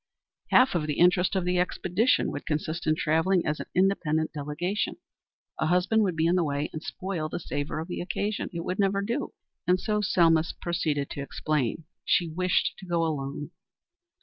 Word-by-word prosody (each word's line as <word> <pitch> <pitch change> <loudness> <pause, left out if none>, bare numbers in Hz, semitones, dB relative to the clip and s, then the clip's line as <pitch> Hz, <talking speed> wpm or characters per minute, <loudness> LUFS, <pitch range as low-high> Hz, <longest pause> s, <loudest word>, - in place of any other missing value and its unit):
Half 255 +1 +5
of 160 -4 0
the 150 - -2
interest 180 +2 +4
of 185 -2 0
the 180 0 +1
expedition 180 +5 +1
would 145 - -6
consist 155 +1 -2
in 155 - +4
travelling 165 +4 +2
as 150 0 -1
an - - -6
independent 170 -4 +1
delegation. 150 +7 -2 0.6
A 155 - +1
husband 180 +6 +3
would 185 -5 +1
be 160 0 +1
in 170 - +3
the 180 -1 +3
way 145 -1 -2
and 155 - -5
spoil 175 -4 -4
the - - -4
savor 145 -3 -3
of 160 +1 -4
the 180 - -4
occasion. 205 +3 -2
It 170 -2 -5
would 185 +3 -3
never 200 0 +2
do, 235 +7 -3 0.3
and 180 +1 +4
so 210 0 0
Selma 165 -5 +4 0.2
proceeded 155 -5 -1
to 140 - -4
explain. 150 0 -1 0.2
She 175 - +2
wished 180 +3 +1
to 190 - -10
go 170 -1 +1
alone. 145 0 -3
170 Hz, 185 wpm, -27 LUFS, 155-185 Hz, 0.6 s, Half